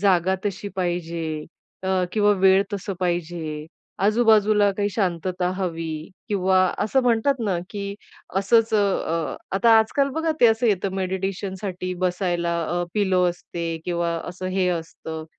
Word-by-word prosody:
जागा 190 -2 +3
तशी 200 0 -3
पाहिजे 175 -2 -2 0.6
अ, 190 -1 +1
किंवा 210 -1 +3
वेळ 190 +1 +5
तसा 200 0 -3
पाहिजे, 170 -3 -2 0.4
आजूबाजूला 215 -1 +4
काही 205 0 +1
शांतता 180 -2 -1
हवी 165 -4 -4 0.2
किंवा 190 -2 +2 0.2
असं 250 +5 +2
म्हणतात 245 +3 +3
ना 195 -4 +1
की 200 -1 -4 0.4
असंच 225 +3 +3
अ, 190 -5 0 0.2
आता 230 +3 +4
आजकाल 275 +6 +2
बघा 320 0 +1
ते 240 - +8
असं 225 +2 +3
येतं, 195 -2 +1
मेडिटेशनसाठी 190 0 -3
बसायला 175 -2 0
अ, 175 +2 -1
पिलो 190 -3 +2
असते 170 -1 -5 0.2
किंवा 170 -1 -1 0.2
असं 180 +1 -6
हे 185 -1 +2
असतं. 165 -2 -4
190 Hz, 135 wpm, -23 LUFS, 175-205 Hz, 0.6 s, ते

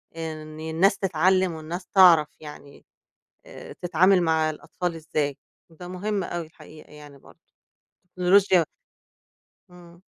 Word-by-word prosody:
إن 155 -1 -7
الناس 160 +5 +1
تتعلِّم، 185 0 +1
والناس 165 +3 -7
تعرف 175 -6 +6
يعني 150 -2 -13 0.6
آآ - - -11
تتعامل 180 +2 +2
مع 160 -1 +1
الأطفال 165 +3 -5
إزاي 150 -3 -3 0.3
وده 175 +2 -11
مهم 195 +2 -3
أوي 170 -1 -5
الحقيقة 155 -1 -16
يعني 145 -1 -14
برضه. - - -20 0.7
التكنولوجيا 185 0 +3 1.1
إمم. 175 -1 -17
170 Hz, 110 wpm, -24 LUFS, 155-180 Hz, 1.1 s, تعرف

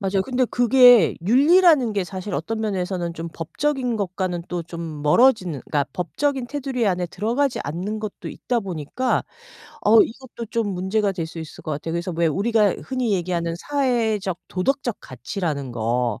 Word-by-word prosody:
맞아요. 195 -1 0
근데 255 +3 0
그게 245 -5 +6
윤리라는 290 - +5
게 200 -3 -1
사실 190 +2 -6
어떤 220 +9 -3
면에서는 180 -4 -2
좀 165 0 -5
법적인 250 - -2
것과는 185 -3 -2
또 175 -1 -3
좀 165 -3 -6
멀어지는 180 - +3
그러니까 145 -2 0
법적인 260 - -1
테두리 265 -3 -2
안에 180 -2 0
들어가지 235 +10 -1
않는 185 +9 -3
것도 215 -2 -6
있다 240 -2 -2
보니까 190 - -2 0.6
어 220 +1 +6
이것도 235 -1 -7
좀 230 -3 0
문제가 195 +3 0
될 170 -3 -4
수 165 - -10
있을 160 -1 -9
것 155 - -5
같아요. 150 +3 -4
그래서 170 +1 -3
왜 170 0 +2
우리가 205 +4 +2
흔히 255 -5 -1
얘기하는 170 -2 -1
사회적 225 -8 0
도덕적 240 +4 -1
가치라는 140 - -4
거 120 +1 -1
195 Hz, 365 characters per minute, -22 LUFS, 170-245 Hz, 0.6 s, 그게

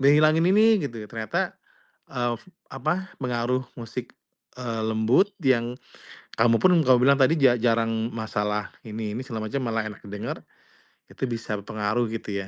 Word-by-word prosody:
ngehilangin 155 +4 +5
ini 215 +2 +6 0.2
gitu. 120 -4 -9
Ternyata, 110 -2 -2 0.6
eee, 120 -1 -1 0.4
apa 155 +8 -2
pengaruh 125 0 0 0.2
musik, 120 +1 -7 0.4
eee, 115 -3 -3
lembut 110 - +3
yang, 125 -3 +2 0.6
kamu 115 -1 +4
pun 185 - +6
kamu 130 -3 +5
bilang 140 +1 +5
tadi 135 +5 +5
ja 130 -3 +6
jarang 115 -1 +1
masalah 105 -2 -2
ini 110 -1 -4
ini - - -3
segala 110 -4 -4
macam 140 +4 -2
malah 115 -2 -1
enak 105 - -11
didengar, 105 +1 -5 0.7
itu - - -9
bisa 115 -2 -3
berpengaruh 110 +3 -1
gitu 105 -3 -4
ya. - - -13
120 Hz, 150 wpm, -25 LUFS, 110-130 Hz, 0.7 s, ini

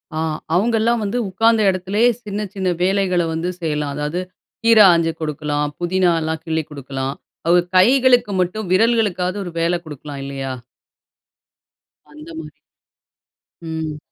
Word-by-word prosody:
ஆ - - -1 0.4
அவங்க 225 +6 +2
எல்லாம் 235 +1 +2
வந்து 205 +4 -2
உக்கார்ந்த 225 +4 +3
இடத்துலயே 195 +5 +2
சின்ன 205 -1 -4
சின்ன 190 -2 -2
வேலைகள 185 -1 +2
வந்து 165 +2 -2
செய்யலாம். 150 -3 -2
அதாவது, 150 +4 -2 0.4
கீரை 225 -2 +7
ஆஞ்சு 165 -1 +2
கொடுக்கலாம், 150 -1 -2
புதினா 180 +1 +2
எல்லாம் 160 0 -3
கிள்ளி 160 -1 -1
கொடுக்கலாம். 135 -1 -5 0.3
அவங்க 175 +1 +4
கைகளுக்கு 245 +2 +4
மட்டும், 180 +2 -3
விரல்களுக்காவது 205 -3 +2
ஒரு 175 - -6
வேலை 170 +1 +1
கொடுக்கலாம் 145 -2 -8
இல்லையா? 135 -1 -4 1.6
அந்த 305 +1 -12
மாதிரி. - - -10 1.0
ம். 160 -2 -4
180 Hz, 130 wpm, -20 LUFS, 155-210 Hz, 1.6 s, கீரை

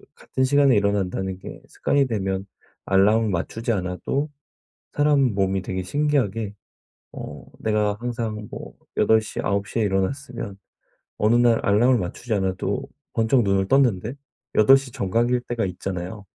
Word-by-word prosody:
같은 130 - -3
시간에 140 -1 +4
일어난다는 95 -2 0
게 - - -10
습관이 140 -1 +1
되면 95 -4 -2 0.4
알람을 105 +3 +3
맞추지 105 +6 -2
않아도 100 +9 -2 0.6
사람 145 -5 +3
몸이 95 -1 0
되게 95 0 -4
신기하게 115 -4 0 0.6
어 - - -8
내가 105 -1 0
항상 115 -3 -4
뭐 - - -7 0.3
8 110 0 +5
시, 110 - -5
9 100 +1 0
시에 115 - -1
일어났으면 105 +2 -2 0.6
어느 105 +2 +3
날 120 -1 +5
알람을 120 +6 +4
맞추지 110 +4 -4
않아도 95 +4 -1 0.3
번쩍 115 +3 +3
눈을 95 -1 +1
떴는데 120 -4 +2 0.4
8 135 +5 +7
시 135 -1 -7
정각일 120 +5 +1
때가 120 -3 -1
있잖아요. 95 +2 -5
105 Hz, 285 characters per minute, -23 LUFS, 95-120 Hz, 0.6 s, 8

